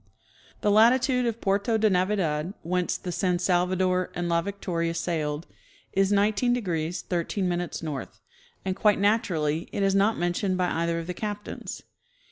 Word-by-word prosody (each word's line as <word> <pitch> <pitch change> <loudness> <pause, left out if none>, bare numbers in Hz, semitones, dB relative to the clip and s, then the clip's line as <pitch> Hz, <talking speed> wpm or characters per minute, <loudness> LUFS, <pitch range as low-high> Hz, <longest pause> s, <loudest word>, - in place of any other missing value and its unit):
The 205 - +2
latitude 245 +3 +4
of 230 -1 -2
Puerto 200 +3 +1
cle 215 -1 +3
Navidad, 180 -3 0
whence 180 +1 0
the 180 - -5
San 180 0 +1
Salvado7' 180 0 +1
and 175 0 -2
La 170 0 +2
Victoria 170 -3 -2
sailed, 160 -2 -2 0.5
is 195 +1 +2
19° 200 -5 +1
13' 175 0 -1
north, 150 -4 -5 0.5
and 190 -1 -1
quite 205 +1 +3
naturally 170 -7 +1
it 200 - -1
is 195 0 +3
not 200 +3 +3
mentioned 175 +2 0
by 180 -1 +1
either 170 +1 0
of 165 - -4
the 180 - -4
captains. 210 +2 -6
185 Hz, 145 wpm, -26 LUFS, 170-205 Hz, 0.5 s, latitude